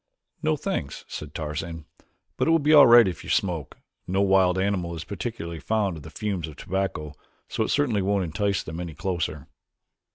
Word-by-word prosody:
"No, 155 -1 +1
thanks," 110 - -4
said 75 0 -8
Tarzan, 80 +1 -4 0.5
"but - - 0
it - - +3
will 165 - +6
be 150 0 +3
all 145 -3 +9
right 120 -2 +8
if 90 -4 -4
you - - -9
smoke. 85 -6 -1 0.3
No 95 +2 +1
wild 95 -2 +4
animal 95 -3 -1
is 80 - -5
particularly 100 -6 -5
fond 105 -3 0
of - - -9
the - - -10
fumes 100 -7 -3
of 75 - -10
tobacco 95 -6 -3 0.3
so - - -1
it - - -3
certainly 125 -8 +2
won't 100 0 +1
entice 100 +3 -1
them 80 +1 -6
any 85 -3 -6
closer." 85 -6 -3
95 Hz, 190 wpm, -25 LUFS, 80-105 Hz, 0.5 s, all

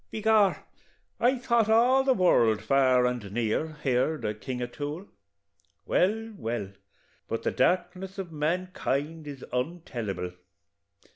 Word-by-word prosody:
"By - - -4
Gor, 215 -3 +4 0.6
I 255 +3 +3
thought 235 -3 +2
all 245 +4 +5
the 265 -1 +3
world, 115 - +3
far 130 +1 +4
and 120 -5 -2
near, 120 +8 -1
heerd 135 +4 +1
o' 105 - 0
King 125 +3 -5
O'Toole 145 +8 -5 0.8
well, 225 +4 +1
well, 115 -4 -3 0.6
but - - -3
the - - 0
darkness 185 +1 0
of 185 -3 -5
mankind 155 -1 -2
is 140 -3 -8
ontellible! 125 - -3
155 Hz, 125 wpm, -28 LUFS, 125-195 Hz, 0.8 s, all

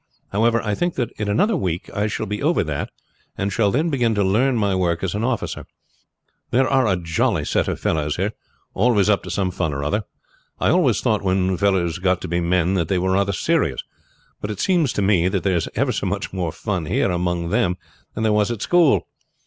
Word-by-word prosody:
However, 115 +3 +2
I 105 -2 -1
think 175 - -1
that 125 -3 -2
in 105 -1 -1
another 200 - +2
week 90 - -2
I 105 +1 +1
shall 105 - -3
be 105 0 -4
over 155 - +2
that, 75 -3 -3 0.5
and 100 0 -2
shall 105 -1 +2
then 155 +10 0
begin 120 -5 +1
to 100 - +2
learn 120 +8 +2
my 100 -3 +1
work 85 -2 0
as 95 - -1
an 105 +2 -2
officer. 125 -1 -2 0.8
They 120 - 0
are 130 -1 +3
a 95 -3 +2
jolly 85 -1 0
set - - 0
of - - -2
fellows 75 -1 0
here, 95 +4 -1 0.4
always 105 -2 +3
up 100 - +2
to 90 - -9
some 90 +1 -1
fun 80 -4 -2
or 70 - -3
other. 100 +9 0 0.6
I - - +2
always - - +3
thought - - +1
when 95 0 +1
fellows 90 -4 +1
got 90 -1 +1
to - - -5
be 85 +1 0
men 90 +1 +1
they 90 0 0
were 95 +1 0
rather 100 +1 +2
serious, 95 - 0 0.6
but 105 - -4
it 105 - -5
seems 170 -8 +2
to 100 - -1
me 95 -3 +3
that 95 0 -1
there 95 -2 +1
is 85 - -1
ever - - +1
so - - -2
much - - -3
more 90 -4 -2
fun 90 -1 -3
here - - +1
among 90 -1 -1
them 90 -2 +1 0.4
than 110 - -2
there 110 -1 +2
was 105 0 +2
at 115 -3 -3
school. 175 -5 +3
100 Hz, 220 wpm, -21 LUFS, 90-110 Hz, 0.8 s, are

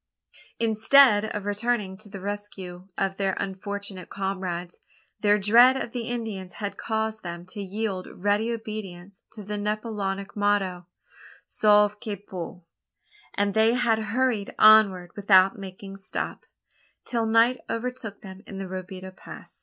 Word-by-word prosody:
Instead 225 0 +5
of 210 -2 -4
returning 205 -1 -1
to 210 +2 -14
the 200 -1 -8
rescue 190 -2 -6
of 195 0 -1
their 195 -1 0
unfortunate 195 -1 -5
comrades, 185 -3 -4 0.4
their 210 0 +4
dread 235 +6 +6
of 240 - -4
the 240 -2 -4
Indians 220 -7 -4
had 205 +2 -5
caused 220 0 -2
them 175 0 -7
to 205 +3 -8
yield 195 -1 -3
ready 205 +4 +1
obedience 200 -4 -7
to 210 - -9
the 205 +1 -4
Napoleonic 205 -2 -3
motto, 195 -4 0 0.6
sauve 210 -1 +3
qui 210 -1 -4
peut: 180 -2 -8 0.7
and 200 0 +1
they 220 +2 +4
had 235 -3 +2
hurried 220 -1 -1
onward 200 -5 +6
without 195 +1 +5
making 195 0 -9
stop, 195 - -5 0.6
till 230 -2 -1
night 230 +3 +4
overtook 230 -3 -4
them 190 -1 -10
in 195 - -8
the 195 - -4
Robideau 185 0 -7
Pass. - - -12
205 Hz, 140 wpm, -26 LUFS, 190-220 Hz, 0.7 s, dread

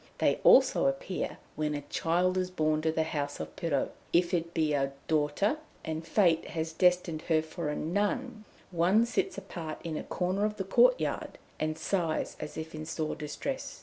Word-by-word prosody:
They - - +2
also - - +6
appear - - -2 0.2
when 150 -1 -1
a 145 - -3
child 175 +5 +1
is 185 -1 0
born 155 -3 +1
to 160 0 +1
the 160 0 +1
house 145 -2 -3
of - - -6
Pirou; 165 -6 0 0.2
if 175 +1 +3
it 170 -1 0
be 155 -3 +1
a 135 -1 0
daughter, 155 - +1 0.3
and 160 +1 -4
Fate 170 -2 +3
has 160 0 -3
destined 180 -2 +2
her 155 -1 +4
for 160 0 -4
a 150 - -2
nun, 210 +6 -1 0.3
one 185 +6 +4
sits 235 - -1
apart 170 -5 -6
in 160 -2 -3
a - - -4
corner 185 +3 -1
of 210 0 0
the 195 - -1
courtyard, - - +2 0.2
and 155 0 -1
sighs 165 -1 -1
as - - -6
if 160 +1 -6
in 155 0 -5
sore 160 -1 -2
distress. 160 - -5
165 Hz, 180 wpm, -30 LUFS, 155-185 Hz, 0.3 s, also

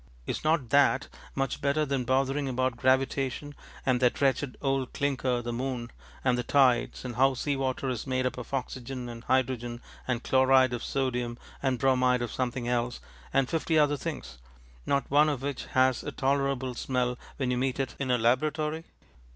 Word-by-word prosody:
Is - - -3
not 155 -6 +1
that 140 -1 +4 0.3
much 135 0 -1
better 145 +2 +2
than 135 -3 -1
bothering 135 +2 +1
about 130 -1 0
gravitation 135 +3 0 0.3
and 130 -2 +3
that 125 -1 +2
wretched 135 -1 +1
old 135 -2 -1
clinker 130 -3 0
the 120 0 -3
moon, 125 -1 -3 0.3
and 125 -1 +2
the - - -1
tides, 130 -3 +2
and 120 -2 -5
how 135 +1 +4
sea 145 +3 -1
water 135 0 -2
is 125 0 -3
made 130 0 0
up 125 -1 -1
of - - -9
oxygen 130 -1 -4
and 115 -1 -8
hydrogen 125 -2 0 0.3
and 125 -2 -1
chloride 130 -1 +4
of 120 - -3
sodium 125 -3 -1 0.2
and 130 -2 +1
bromide 125 -2 +3
of 120 - -4
something 125 -1 -2
else, 120 0 -1 0.3
and 135 -1 +2
fifty 160 0 0
other 145 -1 +4
things, 65 - -6 0.5
not 140 -2 +1
one 150 +2 +5
of 135 -3 -3
which 140 -2 -3
has 130 -1 +2
a - - -4
tolerable 135 -2 0
smell 125 0 -1 0.2
when 130 -2 0
you 125 - 0
meet 130 +1 -1
it 130 -5 -1
in 140 -2 -2
a 125 - +4
laboratory? 150 +7 +1
130 Hz, 180 wpm, -28 LUFS, 125-135 Hz, 0.5 s, one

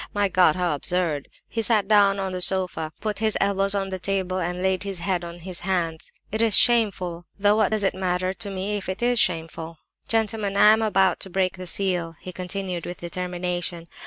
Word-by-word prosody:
My 205 -1 +2
God, 180 -4 +4
how 180 -3 0
absurd!" 155 -1 -1 0.2
He 230 - -2
sat 215 -3 +2
down 200 -2 +4
on 190 -1 -2
the 185 0 -4
sofa, 180 -4 0
put 210 -2 -2
his 220 -1 +1
elbows 195 0 +1
on 195 -1 -1
the 190 -1 -4
table, 185 -1 -1
and 180 +1 -3
laid 190 -1 +1
his 195 -1 -3
head 180 0 -1
on 170 0 -7
his 175 +1 -6
hands. 175 -3 -2 0.2
"It 220 +2 0
is 225 -3 +4
shameful—though 205 -3 +2
what 215 -3 +3
does 215 -1 0
it 195 - +2
matter 185 0 -1
to 200 +2 -6
me 195 +2 -2
if 195 - -6
it 190 +5 -3
is 245 -1 +3
shameful? 165 -2 -1 0.3
"Gentlemen, 220 -2 0
gentlemen! - - 0
I - - +8
am 220 - +1
about 195 -3 +2
to 190 - -4
break 185 0 0
the 185 -1 -8
seal," 175 -3 -1
he 185 - -8
continued, 180 -1 -4
with 175 0 -6
determination. 175 -1 -3
185 Hz, 210 wpm, -24 LUFS, 175-200 Hz, 0.3 s, I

